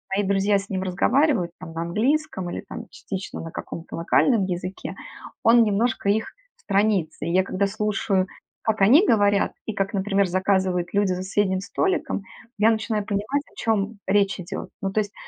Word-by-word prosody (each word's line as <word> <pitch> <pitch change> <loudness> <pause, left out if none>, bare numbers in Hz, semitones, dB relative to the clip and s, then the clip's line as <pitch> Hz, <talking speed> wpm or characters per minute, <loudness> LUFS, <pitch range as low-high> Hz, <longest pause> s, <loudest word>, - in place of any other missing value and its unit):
мои 205 - +1
друзья 200 +1 +2
с 200 - -10
ним 190 -1 -2
разговаривают, 190 - +2
там 165 - -9
на 165 +1 -3
английском 215 - 0
или - - -4
там - - -8
частично 195 0 -6
на 165 - -7
каком-то 165 - -7
локальном 200 +5 +3
языке, 185 +1 -5 0.5
он 235 +1 +6
немножко 215 0 +1
их 215 +2 +1 0.3
сторонится. 200 - 0
И 170 - -1
я 185 +1 +4
когда 200 +1 0
слушаю, 195 -2 0 0.4
как 220 -2 0
они 285 - +6
говорят 205 -2 +3
и 220 - -3
как, 195 +2 -2
например, 195 0 +1
заказывают 185 -1 +1
люди 205 -1 +2
за - - -3
соседним 190 0 +1
столиком, 355 - -1 0.4
я 220 +2 +5
начинаю 220 -2 -1
понимать, 215 +8 -1
о - - -25
чем 210 -1 -1
речь 200 +1 +2
идет. 185 +2 -6
Ну 195 - -1
то 215 - +1
есть 205 -1 -6
200 Hz, 175 wpm, -24 LUFS, 190-215 Hz, 0.5 s, он